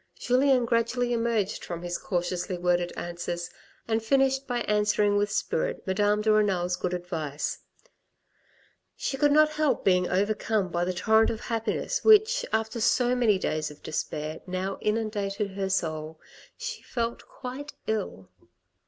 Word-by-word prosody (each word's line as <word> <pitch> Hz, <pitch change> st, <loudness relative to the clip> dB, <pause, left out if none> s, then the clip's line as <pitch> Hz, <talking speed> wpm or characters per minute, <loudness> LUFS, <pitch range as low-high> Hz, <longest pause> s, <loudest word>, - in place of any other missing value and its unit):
Julien 255 Hz, 0 st, +3 dB
gradually 240 Hz, +1 st, +1 dB
emerged 230 Hz, -4 st, 0 dB
from 170 Hz, 0 st, -6 dB
his 175 Hz, 0 st, -3 dB
cautiously 180 Hz, 0 st, -2 dB
worded 175 Hz, 0 st, +1 dB
answers, 175 Hz, 0 st, -4 dB, 0.4 s
and 225 Hz, 0 st, +1 dB
finished 270 Hz, +3 st, +2 dB
by 245 Hz, -1 st, -1 dB
answering 210 Hz, -1 st, +2 dB
with 205 Hz, 0 st, +2 dB
spirit 485 Hz, -, -1 dB
Madame 205 Hz, +2 st, +1 dB
de 215 Hz, -, +3 dB
Renal's 185 Hz, -4 st, +2 dB
good 180 Hz, 0 st, -2 dB
advice. 160 Hz, -5 st, -4 dB, 1.4 s
She 270 Hz, -, -2 dB
could 290 Hz, +1 st, +3 dB
not 305 Hz, +1 st, +6 dB
help 300 Hz, -3 st, +1 dB
being 180 Hz, -1 st, +3 dB
overcome 205 Hz, +1 st, 0 dB
by 175 Hz, 0 st, 0 dB
the 185 Hz, -, -1 dB
torrent 220 Hz, +5 st, +3 dB
of 225 Hz, -, -4 dB
happiness 230 Hz, -1 st, -2 dB
which, 440 Hz, +3 st, +6 dB
after 220 Hz, +1 st, -1 dB
so 245 Hz, +2 st, +3 dB
many 230 Hz, -5 st, +3 dB
days 155 Hz, -4 st, -2 dB
of 150 Hz, -, -14 dB
despair, 155 Hz, 0 st, -4 dB
now 185 Hz, +1 st, -3 dB
inundated 210 Hz, -2 st, -1 dB
her 195 Hz, 0 st, -3 dB
soul. 155 Hz, -4 st, -2 dB, 0.4 s
She -, -, -5 dB
felt 235 Hz, -1 st, -3 dB
quite 275 Hz, +3 st, -7 dB
ill. 190 Hz, -, -3 dB
210 Hz, 145 wpm, -27 LUFS, 180-235 Hz, 1.4 s, not